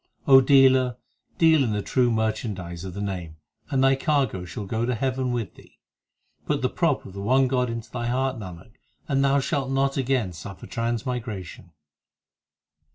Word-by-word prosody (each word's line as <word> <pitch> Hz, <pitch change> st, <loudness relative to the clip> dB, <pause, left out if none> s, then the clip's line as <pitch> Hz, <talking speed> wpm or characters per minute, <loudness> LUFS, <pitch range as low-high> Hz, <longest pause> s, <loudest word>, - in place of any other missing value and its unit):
O 135 Hz, -1 st, +8 dB
dealer, 130 Hz, -2 st, +4 dB, 0.4 s
deal 160 Hz, -3 st, +5 dB
in 115 Hz, -4 st, -1 dB
the 105 Hz, -1 st, -2 dB
true 125 Hz, -2 st, +2 dB
merchandise 110 Hz, -6 st, -2 dB
of 95 Hz, -1 st, -7 dB
the 100 Hz, -, -4 dB
Name, 90 Hz, -5 st, -5 dB, 0.3 s
And 135 Hz, -3 st, +1 dB
thy 135 Hz, 0 st, +5 dB
cargo 135 Hz, -, 0 dB
shall 90 Hz, +4 st, -6 dB
go 110 Hz, +4 st, -2 dB
to 125 Hz, +1 st, 0 dB
heaven 130 Hz, +1 st, -1 dB
with 115 Hz, -5 st, -3 dB
thee. -, -, -19 dB, 0.7 s
Put -, -, -1 dB
the -, -, +2 dB
prop -, -, 0 dB
of 95 Hz, -, -10 dB
the 100 Hz, -, -6 dB
one 130 Hz, +5 st, +3 dB
God 125 Hz, -1 st, 0 dB
into 115 Hz, -1 st, -6 dB
thy 120 Hz, -1 st, -3 dB
heart, 130 Hz, 0 st, -1 dB
Nanak, 90 Hz, 0 st, -10 dB, 0.4 s
and 135 Hz, -1 st, +1 dB
thou 140 Hz, +1 st, +3 dB
shalt 135 Hz, -1 st, -1 dB
not 135 Hz, +1 st, 0 dB
again 130 Hz, -8 st, 0 dB
surfer 90 Hz, +2 st, -9 dB
transmigration. 115 Hz, -6 st, -4 dB
120 Hz, 170 wpm, -25 LUFS, 100-135 Hz, 0.7 s, O